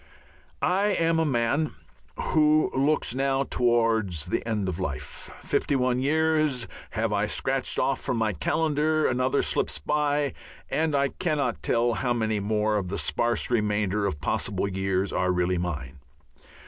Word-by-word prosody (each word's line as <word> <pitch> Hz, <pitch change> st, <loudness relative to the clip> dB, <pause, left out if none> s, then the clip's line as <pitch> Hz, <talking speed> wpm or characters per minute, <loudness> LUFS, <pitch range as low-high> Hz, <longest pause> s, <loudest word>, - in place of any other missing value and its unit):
I 190 Hz, +3 st, +2 dB
am 165 Hz, -5 st, +2 dB
a 160 Hz, -, +2 dB
man 135 Hz, +4 st, 0 dB, 0.4 s
who 155 Hz, 0 st, +3 dB
looks 140 Hz, -2 st, +1 dB
now 135 Hz, +1 st, +1 dB
towards 115 Hz, -, +1 dB
the 90 Hz, -, -2 dB
end 105 Hz, -4 st, -1 dB
of 90 Hz, -1 st, -3 dB
life; 75 Hz, -8 st, -5 dB
fifty 140 Hz, -, 0 dB
one 125 Hz, -1 st, +1 dB
years 155 Hz, -3 st, +1 dB, 0.2 s
have -, -, -1 dB
I -, -, +1 dB
scratched -, -, -1 dB
off -, -, +1 dB
from 125 Hz, -, -2 dB
my 110 Hz, -2 st, +1 dB
calendar, 155 Hz, -, +1 dB
another 130 Hz, +2 st, +1 dB
slips -, -, 0 dB
by, 145 Hz, -, 0 dB, 0.4 s
and 155 Hz, -1 st, +1 dB
I 140 Hz, 0 st, +2 dB
cannot 150 Hz, -9 st, -1 dB
tell 120 Hz, 0 st, +1 dB
how 125 Hz, +1 st, 0 dB
many 110 Hz, -2 st, 0 dB
more 105 Hz, +1 st, 0 dB
of 95 Hz, -3 st, -2 dB
the 90 Hz, -, -3 dB
sparse 120 Hz, 0 st, 0 dB
remainder 105 Hz, -2 st, +1 dB
of 75 Hz, -7 st, -3 dB
possible 100 Hz, +6 st, -1 dB
years 95 Hz, 0 st, -1 dB
are 90 Hz, 0 st, +1 dB
really 90 Hz, 0 st, +1 dB
mine. 75 Hz, -6 st, -4 dB
120 Hz, 150 wpm, -26 LUFS, 100-145 Hz, 0.4 s, who